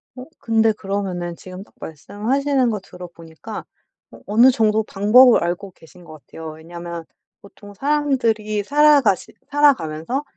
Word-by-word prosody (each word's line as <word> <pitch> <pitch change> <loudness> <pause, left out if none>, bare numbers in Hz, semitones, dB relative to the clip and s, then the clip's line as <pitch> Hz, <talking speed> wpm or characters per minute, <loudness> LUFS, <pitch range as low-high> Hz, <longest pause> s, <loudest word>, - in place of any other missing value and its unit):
어 255 0 -9
근데 225 -1 +2
그러면은 190 -4 -4
지금 185 +2 -11
딱 - - -26
말씀하시는 255 - -1
거 215 -2 -2
들어 180 -1 -11
보니까 170 +5 -10 0.5
어 - - -14
어느 235 +5 +5
정도 220 -2 +1
방법을 220 +5 +5
알고 175 +3 -4
계신 175 +1 -18
것 155 -2 -13
같아요. 160 -1 -9
왜냐하면 170 +1 -9 0.4
보통 205 0 -15
사람들이 230 -6 -1
살아가시 285 -5 +3 0.2
살아가면서 260 - +1
205 Hz, 325 characters per minute, -20 LUFS, 175-250 Hz, 0.5 s, 어느